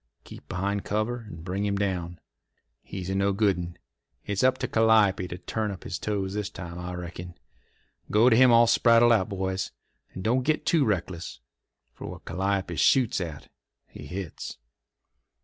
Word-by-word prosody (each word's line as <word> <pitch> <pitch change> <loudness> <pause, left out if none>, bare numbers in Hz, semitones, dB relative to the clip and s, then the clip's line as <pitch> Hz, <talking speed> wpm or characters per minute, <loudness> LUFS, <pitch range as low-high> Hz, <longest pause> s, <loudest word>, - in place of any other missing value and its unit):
Keep - - -13
behind 100 +2 -2
cover 110 +2 -2
and 80 -3 -9
bring 95 +2 -2
him 100 -1 0
down. 90 -4 -2 0.6
He's 95 -2 -7
a - - -1
nogood 100 +1 +2
'un. 85 0 -6 0.5
It's 100 +2 -1
up 130 0 +4
to - - -2
Calliope 110 -5 +3
to 90 - -6
turn 110 +3 -3
up 95 -2 -7
his - - -5
toes 100 -2 -2
this 105 -1 -2
time, 85 -4 -8
I 90 0 -5
reckon. 90 0 -7 0.7
Go 110 +3 +5
to 120 - +6
him 125 +1 +7
all 120 0 +7
spraddled 115 0 +5
out, 95 -5 +1
boys. 95 -1 -2 0.5
And 95 - -6
don't 125 +5 +2
git 155 +4 0
too 160 -5 +3
reckless, 90 -4 -3 0.5
for - - -9
what - - -9
Calliope 95 -1 -1
shoots 115 - +3
at 80 -4 -7 0.4
he - - -11
hits." 90 -2 -6
100 Hz, 165 wpm, -27 LUFS, 90-110 Hz, 0.7 s, him